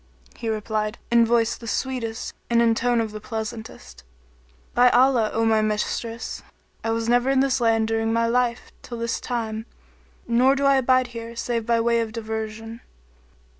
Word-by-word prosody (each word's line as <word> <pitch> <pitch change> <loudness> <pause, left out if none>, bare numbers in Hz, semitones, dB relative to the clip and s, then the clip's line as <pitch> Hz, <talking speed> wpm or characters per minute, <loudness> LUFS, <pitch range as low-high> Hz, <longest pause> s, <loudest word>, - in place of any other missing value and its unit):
He 230 - -4
replied, 215 0 -2
in 235 -1 +5
voice 235 0 +2
the 230 - -11
sweetest 240 -2 -3 0.2
and 235 0 +3
in 230 -1 +4
tone 235 0 +1
the 215 -1 -8
pleasantest, 220 - -7 0.7
"By 250 +1 +6
Allah, 245 -3 +4
O 225 0 0
my 220 -1 +3
mistress, 215 +2 -2 0.4
I 225 - -1
was 225 0 -1
never 245 +2 +3
in 270 -1 +3
this 270 -2 +2
land 225 -1 +3
during 225 0 0
my 230 0 +2
life 240 0 0
till 240 - -8
this 230 0 -2
time, 225 -2 -4 0.6
nor 250 +3 +4
do 280 0 0
I 275 -1 +5
abide 255 0 +3
here 230 0 -7
save 230 -1 -2
by 235 -1 +3
way 235 0 +2
of 220 -1 -4
diversion." 220 0 -5
230 Hz, 170 wpm, -24 LUFS, 225-240 Hz, 0.7 s, By